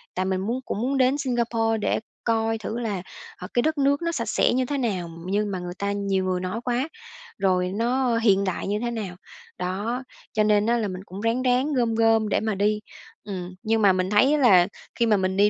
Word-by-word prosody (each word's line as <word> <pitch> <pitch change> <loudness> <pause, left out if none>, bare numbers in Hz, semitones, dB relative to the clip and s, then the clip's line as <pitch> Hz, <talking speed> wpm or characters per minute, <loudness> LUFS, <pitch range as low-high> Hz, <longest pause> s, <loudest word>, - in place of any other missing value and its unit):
tại 185 - 0
mình 190 0 0
muốn 230 +6 -1
cũng 205 - -3
muốn 270 +3 0
đến 260 +1 +3
Singapore 235 -4 0
để - - +1 0.2
coi 225 -1 +1
thử 220 +1 -4
là, 210 -6 -2 0.4
ờ, 180 - -7
cái 240 - +3
đất 315 +4 0
nước 280 +1 +2
nó 335 0 0
sạch 235 -8 -3
sẽ - - +3
như 255 +1 +1
thế 285 +3 -2
nào. 195 -9 -1 0.2
Nhưng 205 +2 0
mà 185 - -3
người 175 0 -5
ta 200 0 -1
nhiều 195 -2 0
người 185 -1 0
nói 185 +5 -3
quá, 250 +3 0 0.5
rồi 185 -1 +1
nó 240 +2 +1
hiện 200 -4 +3
đại 185 -2 -2
như 205 +1 0
thế 240 +1 -2
nào. 210 -6 -4 0.4
Đó, 205 +8 -2 0.3
cho 215 - +3
nên 210 -1 +3
á 235 +1 +2
là 220 -3 -1
mình 185 0 -6
cũng 190 +2 -8
ráng 230 +3 +1
ráng 255 +4 +2
gom 235 -4 +1
gom 225 -1 +3
để - - +2
mà 220 -2 -1
đi. 210 +2 +1 0.5
Ừm, 185 -3 -6
nhưng 225 0 +1
mà 200 -2 +6
mình 185 0 0
thấy 235 +8 +4
á 300 - +2
là 190 -9 +6 0.3
khi 235 - +2
mà 215 -2 +4
mình 190 0 -1
đi 205 +1 +5
220 Hz, 235 wpm, -25 LUFS, 190-240 Hz, 0.5 s, mà